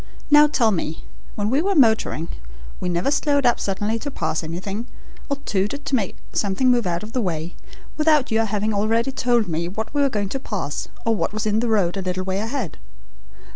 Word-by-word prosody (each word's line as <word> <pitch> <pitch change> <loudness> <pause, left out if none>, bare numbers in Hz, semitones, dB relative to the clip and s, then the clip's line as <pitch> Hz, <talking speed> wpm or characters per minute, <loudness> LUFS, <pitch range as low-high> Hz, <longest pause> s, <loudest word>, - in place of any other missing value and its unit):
Now 295 0 +8
tell 240 -7 +2
me. 165 -4 -3 0.3
When 210 +1 -1
we 275 +4 +3
were 395 +2 +1
motoring 220 - +3 0.5
we 180 - -2
never 175 +10 +1
slowed 285 -2 +2
up 240 - +4
suddenly 205 +3 -1
to 285 - -4
pass 160 - -2
anything, 195 +8 -4 0.4
or 280 - 0
tooted 210 +9 -1
to 275 - +1
make 205 -7 -1 0.2
something 210 +6 +2
move 240 -5 +2
out 170 +2 -1
of 215 - -8
the 255 - +1
way, 170 -3 -2 0.4
without 305 -4 +3
your 225 0 +3
having 215 0 -1
already 225 +5 +1
told 245 -4 +2
me 170 0 -1
what 220 +7 -5
we 290 - +2
were 280 - +4
going 205 -5 -2
to 270 - -3
pass 190 - -4 0.2
or 225 -1 +3
what 210 - -1
was 215 0 -2
in 215 0 +2
the 235 0 0
road 200 -4 +2
a - - -1
little 185 0 -2
way 190 +1 -1
ahead. 225 - -3
215 Hz, 210 wpm, -22 LUFS, 190-255 Hz, 0.5 s, Now